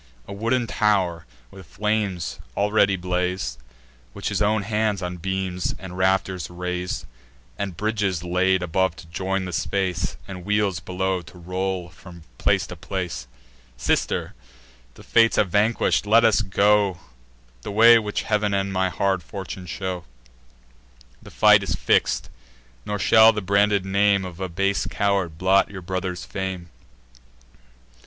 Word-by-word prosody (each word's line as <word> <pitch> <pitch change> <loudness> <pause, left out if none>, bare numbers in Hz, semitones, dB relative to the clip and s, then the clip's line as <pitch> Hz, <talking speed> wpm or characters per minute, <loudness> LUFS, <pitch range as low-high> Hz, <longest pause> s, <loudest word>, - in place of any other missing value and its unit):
A - - -7
wooden 115 +4 0
tow'r 95 -6 0 0.2
with 95 -4 -13
flames 105 -3 -2 0.2
already 100 -1 +3
blaz'd, 90 -7 -2 0.5
Which - - -4
his - - -2
own 105 0 +2
hands 105 -2 -1
on 90 0 -4
beams 95 0 -2
and 95 -2 -9
rafters 95 -1 0
rais'd; 90 0 -4 0.5
And 95 -4 -4
bridges 105 -5 -1
laid 90 +1 +1
above 90 0 0
to 80 - -13
join 95 +2 -2
the 90 - -6
space, 90 -2 -1
And 90 -2 -8
wheels 105 -2 0
below 95 0 -2
to 90 +2 -15
roll 90 0 -3
from 85 0 -14 0.2
place - - +2
to - - -8
place. 90 -8 -5 0.5
"Sister, - - -1 0.6
the - - -14
Fates 115 -1 +4
have 100 -4 +1
vanquish'd: 105 0 +2
let 115 +2 +5
us 110 -2 +4
go 100 -1 +2 0.6
The - - -7
way 115 +3 +7
which 105 -1 -3
Heav'n 105 -2 0
and 100 0 -1
my 95 0 +1
hard 95 0 0
fortune 95 0 -7
show. 90 -1 -4 1.2
The - - -13
fight - - +5
is - - -2
fix'd; - - +1 0.6
nor 105 - -1
shall 110 +3 +6
the 105 - -2
branded 100 0 +2
name 100 0 +2
Of 90 -1 -9
a 95 -1 -3
base 100 +3 0
coward 100 -5 0
blot 95 +2 +3
your 95 -3 -8
brother's 95 0 -4
fame. 95 -3 -5
95 Hz, 145 wpm, -23 LUFS, 90-105 Hz, 1.2 s, way